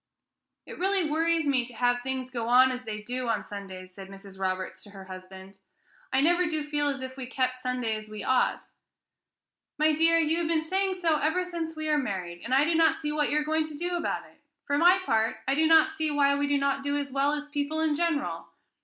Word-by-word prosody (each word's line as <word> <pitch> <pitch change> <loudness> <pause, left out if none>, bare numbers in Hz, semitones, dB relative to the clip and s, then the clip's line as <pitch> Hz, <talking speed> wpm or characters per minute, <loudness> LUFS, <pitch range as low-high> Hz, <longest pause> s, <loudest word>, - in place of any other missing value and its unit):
"It - - -10
really 380 -2 +2
worries 325 +1 +1
me 270 -3 +2
to 245 - -13
have 245 +1 +1
things 260 0 -4
go 235 -2 -3
on 255 +2 +6
so - - -1
as 250 0 -6
they 210 -1 -5
do 250 +2 -4
on 230 - -1
Sundays," 190 -2 -9
said 195 0 -10
Mrs. 195 -1 -13
Roberts 185 0 -3
to 205 - -13
her 195 -1 -11
husband. 190 +1 -11 0.5
"I 265 - +3
never 350 +4 +3
do 310 -2 -1
feel 295 -1 -1
as 275 -2 -2
if 260 0 -7
we 260 -2 -6
kept 255 0 -2
Sunday 250 -3 -1
as 215 0 -8
we 215 -1 -7
ought." 260 -1 +1 1.1
"My 310 +1 +3
dear, 330 +2 +4
you 325 0 +2
have 335 - -1
been 320 -1 +1
saying 380 +2 0
so 330 -4 +1
ever 320 +5 0
since 335 -2 -5
we 310 0 -3
were 300 -1 +2
married, 185 -8 -4
and 235 - -6
I 270 +2 +5
do 335 - +1
not 325 0 +4
see 300 -1 -3
what 300 -1 0
you 300 - +1
are 300 - +1
going 315 0 0
to 305 -2 -9
do 350 +2 -2
about 345 - -2
it. - - -22 0.2
For 285 - 0
my 350 +5 +6
part 225 -4 +1
I 270 - +2
do 315 +3 +3
not 325 +3 +5
see 315 -6 -2
why 285 -1 +3
we 285 0 0
do 285 0 +2
not 275 0 0
do 285 +1 -1
as 280 -1 -4
well 275 +2 +1
as 295 0 -4
people 295 +1 -2
in 315 -2 +1
general. 330 -2 -1
285 Hz, 240 wpm, -27 LUFS, 245-315 Hz, 1.1 s, on